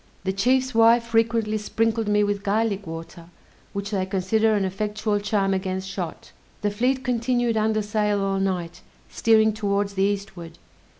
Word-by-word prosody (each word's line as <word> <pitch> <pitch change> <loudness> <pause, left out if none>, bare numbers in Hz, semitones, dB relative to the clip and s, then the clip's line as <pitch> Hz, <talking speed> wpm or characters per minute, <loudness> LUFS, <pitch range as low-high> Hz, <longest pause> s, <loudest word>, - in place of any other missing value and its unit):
The 190 0 -1
chief's 255 +6 +1
wife 230 +1 +5
frequently 225 -1 +1
sprinkled 225 +1 0
me 210 0 +3
with 205 -1 -1
garlic 205 -1 -1
water, 165 +1 -8 0.4
which 200 +1 -5
they 190 -2 -1
consider 215 +3 +1
an 200 -2 +1
effectual 210 +2 -1
charm 200 -1 0
against 190 0 -3
shot. 185 -3 -6 0.3
The 205 - +1
fleet 255 +5 0
continued 240 -1 0
under 215 0 +1
sail 210 0 0
all 195 0 0
night, 180 -3 -2 0.3
steering 220 -1 +3
towards 200 -1 -1
the 190 - -2
eastward. 195 -4 -3
205 Hz, 155 wpm, -24 LUFS, 195-225 Hz, 0.4 s, wife